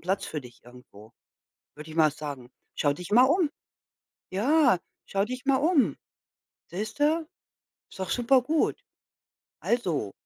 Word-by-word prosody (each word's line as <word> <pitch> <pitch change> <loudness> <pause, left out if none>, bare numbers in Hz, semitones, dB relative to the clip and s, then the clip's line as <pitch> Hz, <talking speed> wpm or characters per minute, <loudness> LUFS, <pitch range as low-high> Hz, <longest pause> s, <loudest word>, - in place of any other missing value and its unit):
Platz 190 +3 -1
für 150 - -4
dich 120 -2 -15
irgendwo, 120 -3 -16 0.6
würde 150 +1 -10
ich 155 - -9
mal 155 -2 +5
sagen. 140 -5 -7 0.2
Schau 145 -1 +1
dich 180 +6 -9
mal 240 +4 +7
um. 320 +2 +2 0.8
Ja, 245 - +3 0.3
schau 195 0 0
dich 255 +1 -6
mal 270 -1 +3
um. 300 0 +2 0.7
Siehst 210 +9 -5
du? 310 +2 +2 0.6
Ist - - -14
doch 190 - -3
super 250 +1 +3
gut. 310 +4 0 0.8
Also 170 - -1
195 Hz, 140 wpm, -27 LUFS, -, 0.8 s, mal